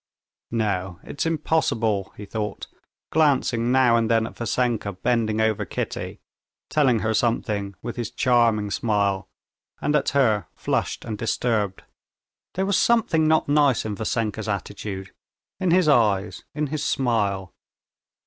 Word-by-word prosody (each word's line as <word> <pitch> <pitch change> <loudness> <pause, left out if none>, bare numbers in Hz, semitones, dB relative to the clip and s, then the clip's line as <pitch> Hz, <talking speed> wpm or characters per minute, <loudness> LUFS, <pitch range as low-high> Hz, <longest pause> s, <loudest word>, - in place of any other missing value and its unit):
"No, 95 -6 -2
it's 145 - -3
impossible," 115 - 0
he 105 - -7
thought, 105 0 -4 0.5
glancing 130 -6 +2
now 130 -2 +5
and 115 -1 +1
then 115 -1 +3
at - - -8
Vassenka 115 -3 -1
bending 110 +2 0
over 110 -1 +1
Kitty, - - -5 0.5
telling 130 -7 +3
her 110 0 0
something 105 -4 0
with 120 +1 -5
his 120 -3 -3
charming 115 -5 +2
smile, 100 -4 0 0.5
and 150 - 0
at 150 - +2
her, 115 -7 +2
flushed - - -2
and 110 -3 -5
disturbed. 110 -4 -1 0.7
There 190 - 0
was 200 0 +2
something 225 -11 +3
not 160 0 +3
nice 145 -5 +3
in 105 - -2
Vassenka's 110 0 -2
attitude, 100 -1 -5 0.5
in 185 -2 +1
his 175 -1 +4
eyes, 105 -8 +2
in 150 0 0
his 150 -1 -2
smile. 100 -9 0
115 Hz, 135 wpm, -24 LUFS, 105-135 Hz, 0.7 s, now